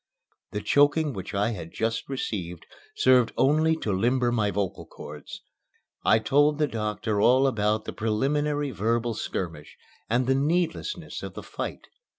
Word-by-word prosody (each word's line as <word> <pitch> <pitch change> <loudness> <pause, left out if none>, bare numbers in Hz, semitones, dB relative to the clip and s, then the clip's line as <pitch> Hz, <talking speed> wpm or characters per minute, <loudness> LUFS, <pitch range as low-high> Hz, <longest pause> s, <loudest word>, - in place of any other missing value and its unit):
The 105 - -4
choking 145 +5 +3
which 95 0 -6
I 105 +3 +1
had 85 -6 -7
just 115 +3 -2
received 90 -10 -4 0.3
served 125 -2 +4
only 155 +4 +3
to 105 - -1
limber 120 +5 +2
my 110 -4 +1
vocal 100 -3 -3
cords. - - -10 0.6
I 110 - +5
told 145 +5 +3
the 155 - +2
doctor 105 -3 -2
all 130 +4 +5
about 110 -4 +1
the - - -5
preliminary 145 +6 0
verbal 115 +2 0
skirmish 80 -7 -5 0.3
and 120 +3 +2
the 135 - +3
needlessness 165 - -1
of - - -7
the - - -7
fight. - - -6
120 Hz, 150 wpm, -26 LUFS, 105-140 Hz, 0.6 s, I